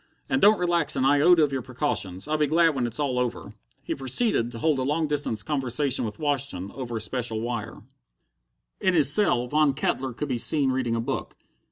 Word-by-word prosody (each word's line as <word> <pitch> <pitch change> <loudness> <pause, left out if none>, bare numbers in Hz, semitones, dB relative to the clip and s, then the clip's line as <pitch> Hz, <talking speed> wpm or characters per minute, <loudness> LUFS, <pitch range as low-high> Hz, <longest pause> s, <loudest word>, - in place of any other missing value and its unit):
And 265 - 0
don't 210 +1 +6
relax 170 -4 +1
an 130 -1 0
iota 155 +4 +5
of 145 - 0
your 135 -1 -2
precautions. 125 -7 -2
I'll 155 - -1
be 150 - +2
glad 165 +3 +3
when 125 -3 -1
it's 120 +3 -4
all 135 -4 -1
over." 125 -1 -4 0.3
He - - -3
proceeded 135 - +1
to 115 - -8
hold 145 +3 0
a - - -1
long 150 +5 0
distance 145 -8 -2
conversation 135 -2 0
with 105 -1 -6
Washington 140 -10 -3
over 120 -3 -5
a - - -4
special 115 -1 -2
wire. 120 -1 -5 1.0
In 185 -1 +1
his 140 -4 +6
cell, 175 -12 +2
Von 150 +1 +1
Kettler 135 -3 -2
could 150 +5 -5
be 125 -2 -1
seen 140 +1 +2
reading 125 -3 -1
a - - -1
book. - - -5
135 Hz, 205 wpm, -25 LUFS, 120-150 Hz, 1.0 s, don't